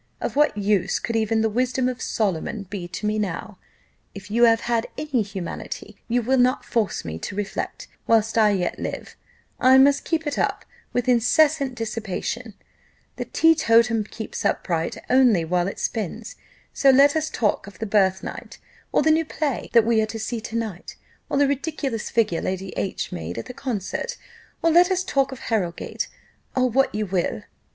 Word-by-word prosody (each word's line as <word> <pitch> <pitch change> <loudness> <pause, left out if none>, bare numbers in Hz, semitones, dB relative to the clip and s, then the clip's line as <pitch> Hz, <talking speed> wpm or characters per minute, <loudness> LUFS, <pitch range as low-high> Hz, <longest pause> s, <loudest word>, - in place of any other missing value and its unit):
Of - - -3
what 295 -6 +3
use 200 -2 +1
could 230 - -3
even 220 0 +1
the 225 - +3
wisdom 250 +3 0
of 255 0 -3
Solomon 200 0 -1
be 190 -4 -4
to 180 +4 -6
me 215 0 0
now? 200 0 -4 0.6
If 200 0 -10
you 235 +2 +5
have 225 0 +3 0.3
any 290 -6 0
humanity, 195 -4 -6
you 240 +1 +1
will 260 +3 +2
not 250 +1 +2
force 225 -4 -1
me 80 0 -5
to - - -6
reflect: 205 -1 -4 0.2
whilst 225 -1 +3
I 220 -2 +5
yet 185 -4 -1
live, - - -5 0.4
I 260 +1 +6
must 280 +1 +5
keep 320 -1 -1
it 295 -1 -2
up - - -1 0.3
with 245 0 -1
incessant 260 +3 +3
dissipation 225 0 -4 0.6
the - - -3
teetotum 230 -8 +3
keeps 220 +1 -6
upright 165 -2 -1
only 245 -9 +4
while 175 +2 +1
it 195 - -5
spins: 220 +1 -4 0.4
so 275 - +4
let 280 +2 +6
us 310 0 0
talk 210 -3 0
of 200 - -12
the 225 - -4
birthnight, 190 -2 0 0.3
or - - +3
the 315 - +4
new 320 +1 +3
play 300 -3 -3
that 230 -2 +6
we 225 -1 +3
are 215 - 0
to 225 - -6
see 225 +1 -3
to 225 0 -7
night, 220 -6 -4 0.3
or - - 0
the 285 0 +4
ridiculous 280 -4 -2
figure 215 -8 +1
Lady 190 0 -3
H 195 - -3
made 85 0 -5
at 115 - -4
the - - -8
concert; 225 -8 -4 0.5
or 330 - +4
let 350 +3 +6
us 375 0 +1
talk 275 -7 +1
of 265 - -8
Harrowgate, 180 -7 -2 0.5
or 255 -1 +3
what 260 -1 +1
you 215 0 -1
will." 185 -2 -1
225 Hz, 180 wpm, -23 LUFS, 200-260 Hz, 0.6 s, I